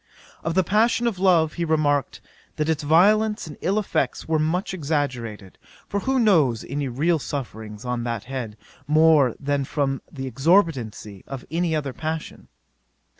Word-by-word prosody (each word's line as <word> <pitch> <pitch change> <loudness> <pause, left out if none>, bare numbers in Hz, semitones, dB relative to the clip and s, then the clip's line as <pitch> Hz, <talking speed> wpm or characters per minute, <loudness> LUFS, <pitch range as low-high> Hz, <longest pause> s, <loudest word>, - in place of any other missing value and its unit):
" - - -25
'Of 165 +1 -2
the 190 - +4
passion 225 +6 +2
of 220 -6 -1
love 170 -5 +3
he 170 - -3
remarked, 150 -3 0 0.3
that 155 +1 -1
its 160 -1 0
violence 210 +8 +3
and 150 -3 -9
ill 195 +4 0
effects 195 -10 -1
were 160 -1 +1
much 175 +5 -1
exaggerated; 130 - -3 0.3
for 200 - -1
who 265 +5 0
knows 160 - +3
any 140 +1 -2
real 155 +7 +1
sufferings 110 -6 -6
on 125 -1 -2
that 115 -3 -3
head, 120 -4 -6 0.3
more 155 -4 +4
than 145 -1 -1
from 135 -1 -1
the 135 -3 -6
exorbitancy 130 - 0
of 135 -2 -7
any 165 0 0
other 140 -4 -2
passion? 160 +2 -5
150 Hz, 160 wpm, -23 LUFS, 130-175 Hz, 0.3 s, the